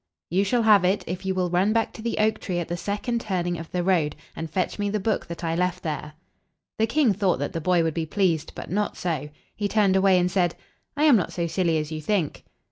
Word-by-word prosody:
"You 190 +3 +3
shall 235 +4 +1
have 210 -4 +6
it 190 +3 +2
if 185 +2 -5
you 190 - 0
will 180 -2 0
run 190 +4 +2
back 225 0 0
to - - -9
the 230 +1 -2
oak 215 0 +2
tree 180 -3 -3
at 175 - -2
the 175 - -1
second 210 +6 -2
turning 175 -5 -2
of 165 - -9
the 180 -1 -1
road, 170 -5 +2 0.2
and 165 0 -5
fetch 185 +5 -2
me 205 0 0
the 210 +1 -1
book 215 +2 -1
that 170 0 -7
I 165 -1 0
left 180 +1 -1
there." 150 -1 -4 0.7
The 220 - +3
king 250 -2 +3
thought 190 -2 +1
that 145 +2 -3
the 165 - -3
boy 175 0 +3
would 160 -1 0
be 160 0 -2
pleased. 170 -4 0
But - - -7
not 205 +2 -1
so. 155 -5 -2 0.3
He 205 - -1
turned 200 -2 +3
away, 190 -1 +5
and 180 0 +1
said, 175 -3 +1 0.4
"I 295 - +2
am 300 -5 +7
not 185 - -1
so 170 - -1
silly 170 -1 +1
as 155 0 -3
you 155 0 -4
think." 175 -3 -1
180 Hz, 255 wpm, -25 LUFS, 170-205 Hz, 0.7 s, am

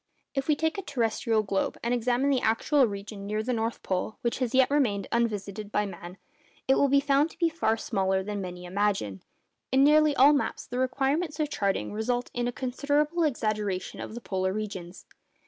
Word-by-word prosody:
If 270 -1 -2
we 305 - +4
take 320 +5 -1
a - - -2
terrestrial 230 - 0
globe, 195 -1 -1
and 235 +1 +1
examine 245 +3 +1
the 260 -3 +2
actual 250 +4 +3
region 200 0 -7
near 215 +1 -1
the 250 +2 -1
North 225 0 -2
Pole 185 +3 -2
which 235 +1 -1
has 255 -2 0
as 260 - -4
yet 260 0 +4
remained 220 -10 +1
unvisited 210 -3 -2
by 210 - +1
man, 180 -1 -9 0.5
it 265 - +5
will 280 - +4
be 280 +1 +4
found 285 +2 +2
to - - -17
be 335 -2 +2
far 315 -8 0
smaller 190 -4 0
than 205 0 -4
many 180 -1 -7
imagine. 190 - -1 0.5
In 265 +1 +5
nearly 300 0 +5
all 280 +3 +7
maps 285 - -1
the 245 - -4
requirements 280 +5 0
of 300 -1 -1
charting 195 - -1
result 245 +3 -1
in 240 0 -1
a - - -1
considerable 285 +7 0
exaggeration 215 - -1
of 220 - -7
the 240 - -6
polar 185 -3 -1
regions. 195 -4 -6
235 Hz, 200 wpm, -27 LUFS, 200-275 Hz, 0.5 s, all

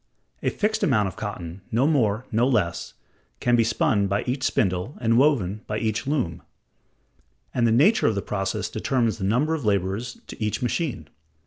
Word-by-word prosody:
A - - +1
fixed 215 +1 -1
amount 105 -8 +2
of - - -12
cotton, 95 -4 -6
no 120 +5 +2
more, 125 -7 +1
no 115 +3 +3
less, 100 -10 -1 0.4
can 120 0 +3
be 115 - +4
spun 105 -2 +1
by 100 +1 0
each 130 +2 -2
spindle 95 +2 0
and 115 -1 +2
woven 115 -7 +2
by 105 - -2
each 110 0 -2
loom; 130 - -1 1.1
and 120 -2 +2
the - - +3
nature 155 - +4
of 110 - +1
the 100 - -1
process 95 -1 -2
determines 115 -4 0
the - - -4
number 125 +10 +2
of 160 -4 -3
laborers 100 +4 -1
to - - -7
each 105 - -1
machine. 125 - -2
115 Hz, 180 wpm, -24 LUFS, 100-130 Hz, 1.1 s, be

